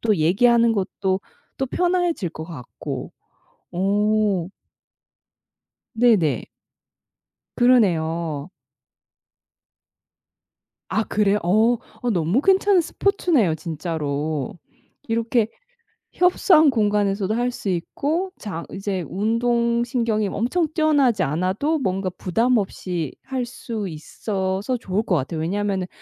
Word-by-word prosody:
또 215 -3 +2
얘기하는 230 +8 +4
것도 190 -1 -1 0.4
또 270 - 0
편해질 350 - 0
것 160 -1 -7
같고. 145 -8 -7 0.6
어. 200 0 +1 1.5
네네. 210 - +3 1.1
그러네요. 170 - +2 2.4
아 220 - +1
그래요? 210 -1 +2
어. 220 +7 +3 0.2
어 245 - 0
너무 180 - +1
괜찮은 385 -1 +4
스포츠네요, 330 - +1
진짜로. 155 -2 -3 0.5
이렇게 230 0 +1 0.7
협소한 355 -3 +5
공간에서도 205 -2 +1
할 245 +1 0
수 205 - -5
있고 300 - -2
장 185 -6 -5
이제 195 -1 -3
운동신경이 235 +1 0
엄청 255 - 0
뛰어나지 280 - +3
않아도 185 - 0
뭔가 190 -5 -1
부담 225 +8 +1
없이 180 - -3
할 260 -2 -3
수 230 -4 -5
있어서 190 +7 -3
좋을 200 0 -2
것 185 - +1
같아요. 155 +2 -2
왜냐면은 195 +1 -1
210 Hz, 215 characters per minute, -22 LUFS, 180-245 Hz, 2.4 s, 협소한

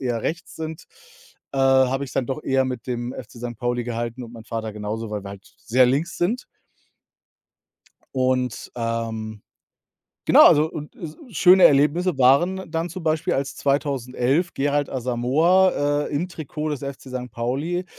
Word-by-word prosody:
eher 120 -3 -1
rechts 165 +2 -4
sind, 160 0 -6 0.7
äh, 135 - -3
habe 135 0 +3
ich's 130 - -10
dann 130 -3 0
doch 135 +3 -4
eher 135 0 +2
mit 125 -3 -5
dem 120 -1 -3
FC 120 -1 -10
Sankt 120 -2 -6
Pauli 120 -1 -1
gehalten 120 +1 -4
und 115 - -12
mein 110 -1 -11
Vater 115 -2 -4
genauso, 105 +2 -4
weil 105 -1 -4
wir 100 - -7
halt 100 0 -13
sehr 125 +1 +3
links 145 +7 -1
sind. 220 +9 0 1.7
Und, 130 -2 0
ähm 115 -2 -3 0.8
genau, - - +8
also 155 +2 +5
und 150 0 -8
es 155 -3 -8 0.2
schöne 185 +3 +7
Erlebnisse 150 +3 +4
waren 175 +8 +3
dann 165 +1 -2
zum 180 +1 -7
Beispiel, 160 +2 0
als 135 +1 -2
2011 140 +2 0
Gerald 145 +1 0
Asamoa, 145 +5 +2
äh, - - -9
im 165 +6 -1
Trikot 155 -2 -5
des 145 - -3
FC 140 -1 -6
Sankt 125 -1 -6
Pauli 145 +10 -2
135 Hz, 160 wpm, -23 LUFS, 120-155 Hz, 1.7 s, genau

